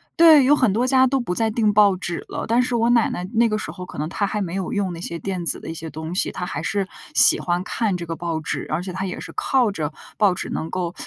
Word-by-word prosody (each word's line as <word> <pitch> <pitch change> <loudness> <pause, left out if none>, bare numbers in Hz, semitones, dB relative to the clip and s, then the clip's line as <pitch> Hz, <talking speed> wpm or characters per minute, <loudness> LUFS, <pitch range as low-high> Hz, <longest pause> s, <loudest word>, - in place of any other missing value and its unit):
对， 320 -4 +7
有 290 +3 +5
很 255 -7 +2
多 235 +4 +1
家 260 0 +4
都 270 +1 0
不 235 -8 -3
再 225 +4 0
订 215 -1 +1
报 205 -2 +5
纸 175 -2 -5
了， - - -4
但 235 +2 +3
是 250 -1 -1
我 230 0 +2
奶 235 -2 +3
奶 180 - -5
那 230 0 +3
个 215 - -1
时 - - -5
候， 185 - -9
可 180 - -10
能 150 - -2
她 200 +2 -1
还 210 +1 -3
没 175 -1 -6
有 190 +1 -3
用 200 -6 -1
那 165 - -8
些 170 -1 -4
电 185 0 -4
子 - - +2
的 - - -11
一 - - -4
些 160 0 -7
东 160 +2 -7
西， 185 - 0
她 180 - -5
还 180 - -5
是 200 -2 -1 0.3
喜 - - +8
欢 175 0 -1
看 210 -2 -1
这 170 - -6
个 165 0 -5
报 165 -2 -3
纸， 155 - -4
而 155 +3 -2
且 185 -1 -6
她 190 +1 -3
也 180 - -6
是 - - -8
靠 255 -5 +1
着 155 -6 -3 0.3
报 200 -4 +3
纸 - - -4
能 160 - -4
够， 175 -1 -3
195 Hz, 315 characters per minute, -22 LUFS, 175-230 Hz, 0.3 s, 喜